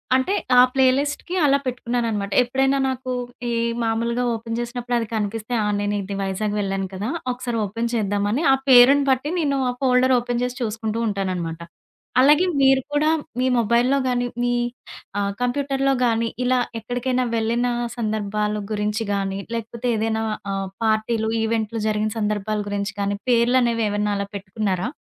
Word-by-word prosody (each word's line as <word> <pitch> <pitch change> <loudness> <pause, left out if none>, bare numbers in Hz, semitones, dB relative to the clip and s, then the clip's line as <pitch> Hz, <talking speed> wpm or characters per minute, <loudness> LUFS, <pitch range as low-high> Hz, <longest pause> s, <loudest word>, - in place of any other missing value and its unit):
అంటే 260 +9 +1 0.2
ఆ - - +10
ప్లే 265 -1 +4
లిస్ట్‌కి 290 +5 -3
అలా 280 -1 +4
పెట్టుకున్నానన్నమాట. 235 -5 -2
ఎప్పుడైనా 270 +2 +1
నాకు 260 -1 -3 0.4
ఈ - - -1 0.3
మామూలుగా 230 +2 0
ఓపెన్ 230 0 -5
చేసినప్పుడు 240 0 -3
అది 230 -1 -2
కనిపిస్తే, 215 +2 -3
ఆ! - - 0
నేను 205 0 -1
ఇది 200 +1 -5
వైజాగ్ 195 +2 -2
వెళ్ళాను 195 -1 -2
కదా 200 +5 -3 0.2
ఒకసారి 245 -1 -3
ఓపెన్ 230 +4 -3
చేద్దామాని 205 +4 0
ఆ - - +5
పేరుని 265 +3 +7
పట్టి 265 +4 0
నేను 280 -4 +1
ఆ - - +1
ఫోల్డర్‌లో 255 0 +4
ఓపెన్ 240 0 -2
చేసి 250 0 -3
చూసుకుంటూ 225 0 -2
ఉంటానన్నమాట. 185 -5 -3 0.6
అలాగే 295 +6 +5 0.2
మీరు 270 0 +5
కూడా, 300 +1 +3 0.3
మీ 255 - +2
మొబైల్‌లో 235 +4 +3
గాని, 245 -1 0 0.2
మీ 245 0 +1 0.7
ఆహ్, 200 0 -1
కంప్యూటర్‌లో 275 +2 +1
గాని, 230 -1 +1 0.2
ఇలా 255 0 +3 0.2
ఎక్కడికైనా 250 +2 -1
వెళ్ళిన 230 +2 +1 0.3
సందర్భాల 210 -2 -1 0.2
గురించి 210 +1 -1
గాని, 195 -1 -2 0.2
లేకపోతే 230 +1 -4
ఏదైనా 220 0 0 0.3
ఆహ్, 195 0 -2 0.2
పార్టీలు, 220 0 +1
ఈవెంట్లు 225 0 -1
జరిగిన 215 0 0
సందర్భాల 210 0 -1
గురించి 200 0 -3
కానీ 200 0 -1
పేర్లు 240 +1 +4
అనేవి 230 -2 +1
ఏమైనా 205 0 0
అలా 200 0 -3
పెట్టుకున్నారా? 195 +1 -2
230 Hz, 150 wpm, -22 LUFS, 210-250 Hz, 0.7 s, ఆ